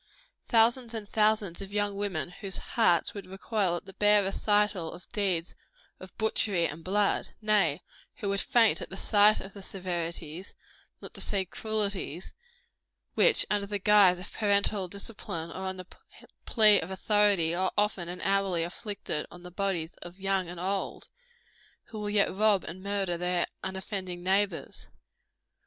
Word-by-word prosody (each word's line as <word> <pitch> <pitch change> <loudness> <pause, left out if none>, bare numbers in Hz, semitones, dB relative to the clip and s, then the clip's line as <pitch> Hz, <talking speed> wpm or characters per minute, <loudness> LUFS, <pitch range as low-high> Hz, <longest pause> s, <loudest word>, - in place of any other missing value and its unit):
Thousands 235 +1 +3
and 215 -2 -5
thousands 210 -4 +1
of 195 0 -7
young 205 -1 0
women 185 -5 -2
whose 195 +1 -5
hearts 175 -8 +2
would 200 -3 -8
recoil 190 -1 -1
at 175 - -6
the 195 - -11
bare 210 0 +4
recital 205 -3 +1
of 175 +1 -11
deeds 190 -6 -1 0.5
of 185 -1 -12
butchery 205 -5 +1
and 160 +1 -5
blood 200 +2 0
nay, 200 -8 +2 0.3
who 200 - -3
would 200 0 +2
faint 230 -2 +3
at - - -6
the 190 - -7
sight 210 +1 +4
of 195 - -9
the 200 - -10
severities, 175 -2 -5 0.5
not - - -9
to - - -8
say 195 -2 0
cruelties, 200 -4 -3 0.8
which, 460 - +5
under 205 -1 +1
the 205 0 -2
guise 200 -2 +5
of 180 +3 -10
parental 200 -2 +2
discipline, 180 -4 -6
or 190 +2 -5
on 190 0 -3
the 185 - -7 0.6
plea 215 -3 +6
of 160 - -5
authority, 195 -3 +2
are 185 +2 0
often 205 -4 0
and 180 - -6
hourly 195 -3 +1
inflicted 190 -3 -4
on 175 0 -13
the 180 - -9
bodies 180 -4 -2
of 175 +2 -10
young 195 -2 0
and 175 -1 -7
old 195 +2 -3 0.8
who 220 - -7
will 210 0 -3
yet 205 -2 +2
rob 205 -1 +3
and 180 +3 -7
murder 195 -3 -1
their 180 0 0 0.2
unoffending 190 -2 -5
neighbors. 190 -1 -1
195 Hz, 160 wpm, -29 LUFS, 180-205 Hz, 0.8 s, plea